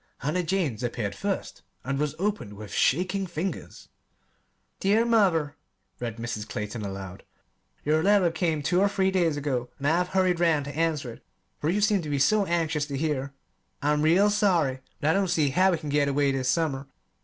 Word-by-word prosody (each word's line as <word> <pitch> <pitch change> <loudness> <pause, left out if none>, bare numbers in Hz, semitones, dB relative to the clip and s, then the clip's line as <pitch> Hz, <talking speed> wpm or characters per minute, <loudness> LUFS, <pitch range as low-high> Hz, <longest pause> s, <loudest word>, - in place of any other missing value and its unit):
Hannah 150 +7 -1
Jane's 165 - -1
appeared 120 -4 -2
first, 200 -1 -4 0.2
and 135 +1 -2
was 150 0 -1
opened 195 - -2
with 105 0 -9
shaking 185 +6 +1
fingers. 175 +3 -5 0.9
Dear 210 +4 +3
Mother 185 -11 +2 0.4
[read 115 -2 -4
Mrs. 115 -2 -5
Clayton 105 +2 -4
aloud]: 95 -2 -6 0.6
Your 155 +2 +3
letter 195 -2 +4
came 160 -3 -1
two 180 +5 +2
or 200 - +4
three 190 -1 +1
days 170 -5 +1
ago, 130 -4 -2
and 140 - -6
I 160 +4 +3
have 180 0 +1
hurried 185 -2 +1
round 160 -5 +2
to 145 0 -7
answer 155 -6 -1
it, - - -17 0.4
for 150 - -1
you 200 +4 +1
seemed 205 -2 +3
to 155 - -6
be 145 - 0
so 200 +8 +3
anxious 160 -3 0
to 140 -2 -4
hear. 140 -2 -2 0.5
I'm 150 +1 +2
real 180 +7 +4
sorry, 175 - +2 0.2
but 155 - +2
I - - +2
don't 195 +1 +1
see 155 -5 +2
how 185 +8 +3
we 175 - +1
can 155 -1 -7
get 145 0 +2
away 140 0 +2
this 130 -1 -1
summer. 140 -3 0
155 Hz, 190 wpm, -26 LUFS, 135-185 Hz, 0.9 s, letter